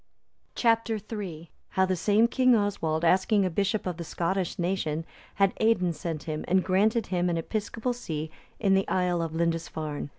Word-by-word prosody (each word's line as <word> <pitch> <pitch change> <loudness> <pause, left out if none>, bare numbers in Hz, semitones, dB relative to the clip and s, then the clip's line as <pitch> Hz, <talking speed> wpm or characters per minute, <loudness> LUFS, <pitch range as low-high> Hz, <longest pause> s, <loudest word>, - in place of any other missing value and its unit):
Chap. 230 -1 +2
III. 200 -7 -5 0.2
How 190 - +2
the 185 0 0
same 210 +6 +3
king 255 0 +4
Oswald, 170 -6 0
asking 190 +4 +3
a 185 - -1
bishop 200 +4 0
of 180 -3 -3
the 170 - -5
Scottish 175 +3 -2
nation, 170 -3 -1 0.3
had 195 -1 +3
Aidan 185 -6 +2
sent 160 0 -5
him, 155 -2 -4
and 185 +1 +3
granted 210 +4 +2
him 180 0 +1
an 170 - 0
episcopal 220 +7 -2
see 160 -9 -5 0.3
in 195 -3 +3
the 195 0 +2
Isle 180 -2 +1
of 165 -1 -3
Lindisfarne. 160 -3 -2
185 Hz, 170 wpm, -27 LUFS, 165-210 Hz, 0.3 s, king